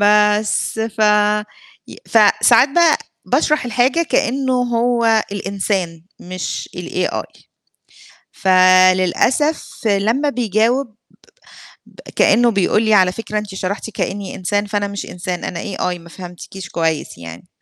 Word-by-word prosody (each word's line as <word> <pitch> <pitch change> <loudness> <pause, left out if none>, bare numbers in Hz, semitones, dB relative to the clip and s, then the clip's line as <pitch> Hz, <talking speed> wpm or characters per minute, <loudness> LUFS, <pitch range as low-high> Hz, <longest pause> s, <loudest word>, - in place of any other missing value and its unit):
بس، 210 +1 +2
ف 220 0 -5 0.9
ي - - -11
فساعات - - +4
بقى 325 +2 +3 0.3
باشرح 305 -4 +1
الحاجة 250 +7 +1
كإنّه 265 -4 0
هو 235 -2 +1
الإنسان 195 -4 -3 0.2
مش 185 0 -5
الAI. - - -4 0.9
فللأسف 185 - +3 0.2
لمّا 225 +8 +1
بيجاوب 235 +1 0 0.9
ب - - -22 0.2
كإنّه 240 0 +4
بيقول 200 +2 +1
لي 220 -1 +2
على 185 -2 +4
فكرة 215 +1 -5
أنتِ 205 -2 -8
شرحتِ 195 +3 -4
كإنّي 200 -2 -4
إنسان، 205 +3 -1
فأنا 205 0 -2
مش 200 0 -6
إنسان، 180 0 -6
أنا 170 - -4 0.2
AI 180 -1 -2
ما 170 0 -15
فهمتكيش 180 +1 -10
كويس 160 - -2
يعني. 85 0 -11
205 Hz, 115 wpm, -18 LUFS, 185-235 Hz, 0.9 s, فساعات